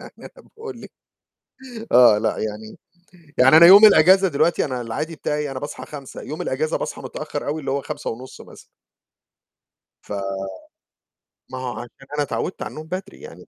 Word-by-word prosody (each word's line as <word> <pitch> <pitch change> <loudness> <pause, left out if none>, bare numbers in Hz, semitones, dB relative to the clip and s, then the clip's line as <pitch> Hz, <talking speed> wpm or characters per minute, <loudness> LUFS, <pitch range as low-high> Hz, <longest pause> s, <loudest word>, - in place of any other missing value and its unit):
يعني - - -12
أنا - - -12 0.2
باقول 450 0 -9
لِك - - -11 1.0
آه، 120 -4 +7
لأ، 110 - -1
يعني 110 0 -6 0.6
يعني 130 +5 +7
أنا 170 - +9
يوم 200 +4 +10
الأجازة 190 0 +6
دلوقتي 165 +1 +1
أنا 130 -3 -4
العادي 150 +8 -5
بتاعي 150 0 -3
أنا 130 - -5
باصحى 145 +1 -7
05:00 140 -3 -10
يوم 155 - -7
الأجازة 155 +4 -2
باصحى - - -6
متأخّر - - -6
أوي 150 +2 -2
اللي 135 - -4
هو 140 0 -1
05:30 130 +1 -7
مثلًا. - - -16 1.4
ف - - -16 1.4
ما 130 - -6
هو 130 -1 -4
عشان 130 +3 -11
أنا 145 - +1
اتعودت 150 +6 -4
على - - -4
النوم 155 +1 -9
بدري 190 +3 -7
يعني، 460 - -12
145 Hz, 165 wpm, -21 LUFS, 130-165 Hz, 1.4 s, يوم